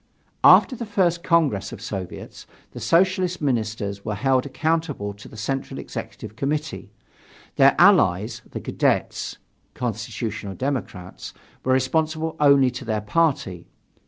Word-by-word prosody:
After 260 Hz, -, +7 dB
the 235 Hz, -1 st, -6 dB
First 180 Hz, -5 st, +1 dB
Congress 155 Hz, -, +1 dB
of -, -, -8 dB
Soviets, 95 Hz, -3 st, -7 dB, 0.2 s
the -, -, -9 dB
Socialist 185 Hz, +1 st, +2 dB
ministers 110 Hz, -7 st, -2 dB
were 105 Hz, -1 st, -3 dB
held 130 Hz, +3 st, +1 dB
accountable 145 Hz, -7 st, -2 dB
to 100 Hz, 0 st, -13 dB
the 110 Hz, -, -13 dB
Central 135 Hz, +6 st, -3 dB
Executive 110 Hz, -, -8 dB
Committee. 145 Hz, -2 st, -3 dB, 0.7 s
Their -, -, +6 dB
allies, 95 Hz, +5 st, +4 dB
the -, -, -6 dB
Cadets -, -, -1 dB, 0.4 s
(Constitutional 110 Hz, -3 st, -4 dB
Democrats) 125 Hz, -9 st, -5 dB, 0.3 s
were 130 Hz, -, +2 dB
responsible 160 Hz, +4 st, 0 dB
only 140 Hz, -3 st, +5 dB
to 125 Hz, +1 st, -7 dB
their 110 Hz, -3 st, -2 dB
party. 105 Hz, -, 0 dB
130 Hz, 125 wpm, -23 LUFS, 105-160 Hz, 0.7 s, After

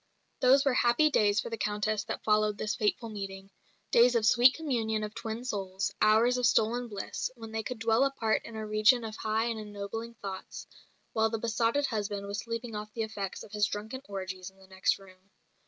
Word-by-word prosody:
Those 270 Hz, +2 st, +5 dB
were 275 Hz, -, +3 dB
happy 245 Hz, +6 st, +4 dB
days 205 Hz, -5 st, +3 dB
for -, -, -4 dB
the 230 Hz, -, -4 dB
Countess 210 Hz, 0 st, -1 dB
that -, -, -5 dB
followed 215 Hz, -1 st, +2 dB
this 215 Hz, -1 st, -1 dB
fateful 225 Hz, +2 st, 0 dB
meeting 195 Hz, -2 st, -7 dB, 0.4 s
days 240 Hz, +1 st, +6 dB
of 225 Hz, -2 st, +2 dB
sweet 245 Hz, +3 st, +6 dB
communion 225 Hz, -8 st, -1 dB
of 210 Hz, 0 st, -5 dB
twin 230 Hz, +1 st, -5 dB
souls, 195 Hz, -3 st, -2 dB
hours 225 Hz, +4 st, +4 dB
of 245 Hz, -, +4 dB
stolen 235 Hz, +2 st, +2 dB
bliss, 205 Hz, -3 st, -4 dB
when 225 Hz, -2 st, -9 dB
they 220 Hz, 0 st, -2 dB
could 235 Hz, +3 st, -5 dB
dwell 225 Hz, +2 st, +3 dB
apart 270 Hz, -5 st, +1 dB
in 230 Hz, -, -9 dB
a 220 Hz, 0 st, -4 dB
region 215 Hz, +3 st, +4 dB
of 220 Hz, -1 st, -6 dB
high 220 Hz, +1 st, 0 dB
and 230 Hz, -2 st, -2 dB
ennobling 215 Hz, +2 st, -6 dB
thoughts, 195 Hz, -3 st, -7 dB, 0.5 s
while 220 Hz, 0 st, +2 dB
the 225 Hz, -, -2 dB
besotted 230 Hz, +5 st, +1 dB
husband 205 Hz, -4 st, -3 dB
was 200 Hz, +1 st, -4 dB
sleeping 230 Hz, +1 st, -5 dB
off 210 Hz, 0 st, -6 dB
the 225 Hz, -, -1 dB
effects 200 Hz, -3 st, -5 dB
of -, -, -13 dB
his 210 Hz, -1 st, +2 dB
drunken 220 Hz, +6 st, -5 dB
orgies 190 Hz, -1 st, -5 dB
in 190 Hz, -, -26 dB
the 190 Hz, -, -17 dB
next 190 Hz, 0 st, 0 dB
room. 190 Hz, 0 st, -18 dB
220 Hz, 205 wpm, -30 LUFS, 205-235 Hz, 0.5 s, days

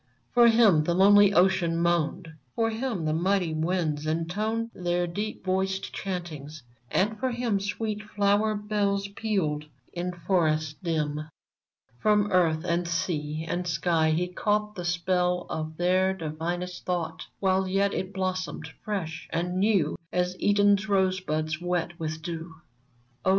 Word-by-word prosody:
For 240 Hz, -1 st, +7 dB
him 220 Hz, -9 st, +5 dB
the 170 Hz, -, +1 dB
lonely 205 Hz, +1 st, +7 dB
ocean 180 Hz, -3 st, +3 dB
moaned; 170 Hz, 0 st, 0 dB, 0.3 s
P'or 225 Hz, 0 st, +2 dB
him 225 Hz, -7 st, -2 dB
the 155 Hz, -, +1 dB
mighty 180 Hz, 0 st, +1 dB
winds 155 Hz, -2 st, -1 dB
intoned 210 Hz, +8 st, -1 dB
Their 175 Hz, 0 st, 0 dB
deep 205 Hz, +6 st, -5 dB
voiced 190 Hz, +1 st, -1 dB
chantings, 155 Hz, -6 st, -5 dB, 0.3 s
and 210 Hz, +3 st, +1 dB
for 260 Hz, -, 0 dB
him 235 Hz, -4 st, 0 dB
Sweet 210 Hz, +1 st, -3 dB
flower 210 Hz, 0 st, +1 dB
bells 205 Hz, -1 st, 0 dB
pealed 190 Hz, -8 st, -1 dB, 0.3 s
in 180 Hz, +1 st, -2 dB
forests 160 Hz, -4 st, 0 dB
dim. 155 Hz, -3 st, -2 dB, 0.7 s
From 210 Hz, +2 st, +3 dB
earth 165 Hz, -3 st, +3 dB
and 170 Hz, 0 st, 0 dB
sea 160 Hz, -3 st, -2 dB
and 180 Hz, +1 st, -2 dB
sky 165 Hz, -2 st, +2 dB
he 170 Hz, +3 st, +1 dB
caught 210 Hz, +3 st, 0 dB
The 180 Hz, -4 st, -6 dB
spell 180 Hz, 0 st, +1 dB
of 155 Hz, 0 st, -4 dB
their 185 Hz, +2 st, +2 dB
divinest 175 Hz, +2 st, -4 dB
thought, 165 Hz, -3 st, -3 dB
While 190 Hz, -1 st, +2 dB
yet 195 Hz, +1 st, +1 dB
it 185 Hz, 0 st, -3 dB
blossomed 185 Hz, -1 st, -3 dB
fresh 165 Hz, -6 st, -4 dB
and 180 Hz, +2 st, -1 dB
new 195 Hz, -7 st, +2 dB, 0.2 s
As 180 Hz, 0 st, 0 dB
Eden's 205 Hz, +1 st, +3 dB
rosebuds 185 Hz, -5 st, 0 dB
wet 175 Hz, -1 st, -2 dB
with 160 Hz, 0 st, -4 dB
dew! 165 Hz, -1 st, -6 dB, 0.7 s
Oh -, -, +2 dB
180 Hz, 140 wpm, -27 LUFS, 165-200 Hz, 0.7 s, For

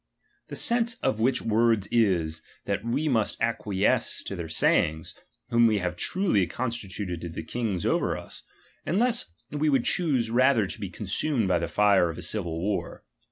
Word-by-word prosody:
The -, -, -7 dB
sense 235 Hz, -1 st, +2 dB
of 120 Hz, -5 st, 0 dB
which 125 Hz, +2 st, +1 dB
words 115 Hz, -2 st, +2 dB
is, 85 Hz, -9 st, +1 dB, 0.2 s
that 100 Hz, 0 st, -2 dB
we 120 Hz, +7 st, -1 dB
must 115 Hz, -7 st, 0 dB
ac 115 Hz, 0 st, 0 dB
quiesce 100 Hz, 0 st, 0 dB
to 100 Hz, -, -5 dB
their 85 Hz, -3 st, -6 dB
sayings, 80 Hz, 0 st, +1 dB, 0.4 s
whom 120 Hz, 0 st, +4 dB
we 110 Hz, -2 st, +2 dB
have 90 Hz, -2 st, -2 dB
truly 170 Hz, -, +1 dB
con 125 Hz, -1 st, -3 dB
stituted 95 Hz, -6 st, -5 dB
to 85 Hz, -, -5 dB
be 80 Hz, 0 st, -6 dB
kings 100 Hz, 0 st, -3 dB
over -, -, +1 dB
us, -, -, -10 dB, 0.4 s
unless 230 Hz, -, +2 dB, 0.2 s
we 150 Hz, +1 st, 0 dB
would 135 Hz, -4 st, +2 dB
choose 135 Hz, -10 st, +1 dB
rather 125 Hz, -2 st, +4 dB
to -, -, -7 dB
be -, -, -5 dB
consumed 135 Hz, -10 st, -1 dB
by 90 Hz, -2 st, +2 dB
the 85 Hz, -, -2 dB
fire 100 Hz, -1 st, +3 dB
of 80 Hz, -, -6 dB
a 90 Hz, -, -6 dB
civil 85 Hz, -3 st, -2 dB
war. 100 Hz, +3 st, -3 dB
110 Hz, 180 wpm, -26 LUFS, 90-125 Hz, 0.4 s, whom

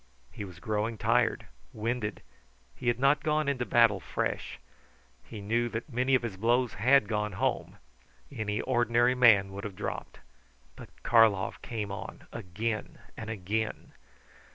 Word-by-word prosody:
He 105 Hz, -, -7 dB
was 90 Hz, -2 st, -11 dB
growing 105 Hz, +4 st, -2 dB
tired, 115 Hz, +2 st, +1 dB, 0.3 s
winded; 110 Hz, 0 st, -3 dB, 0.5 s
he 120 Hz, -, -7 dB
had 120 Hz, -1 st, +3 dB
not 140 Hz, +2 st, +4 dB
gone 155 Hz, -1 st, 0 dB
into 130 Hz, -3 st, -1 dB
battle 115 Hz, -4 st, +4 dB
fresh. -, -, -3 dB, 0.7 s
He 110 Hz, -3 st, -9 dB
knew 120 Hz, +4 st, 0 dB
that 115 Hz, +4 st, -6 dB
many 130 Hz, +2 st, +2 dB
of 125 Hz, -, +1 dB
his 110 Hz, -5 st, -4 dB
blows 120 Hz, +3 st, +2 dB
had 125 Hz, +1 st, +4 dB
gone 105 Hz, -2 st, -1 dB
home. -, -, -2 dB, 0.5 s
Any 110 Hz, -5 st, -2 dB
ordinary 120 Hz, -1 st, +2 dB
man 110 Hz, -6 st, +5 dB
would 100 Hz, +1 st, -7 dB
have 105 Hz, -3 st, -6 dB
dropped; -, -, -5 dB, 0.6 s
but -, -, -11 dB
Karlov 110 Hz, -4 st, +3 dB
came 105 Hz, -4 st, -4 dB
on 105 Hz, +3 st, -8 dB
again 105 Hz, +1 st, -4 dB, 0.2 s
and 110 Hz, -, -7 dB
again. 110 Hz, +1 st, -3 dB
115 Hz, 145 wpm, -29 LUFS, 105-120 Hz, 0.7 s, man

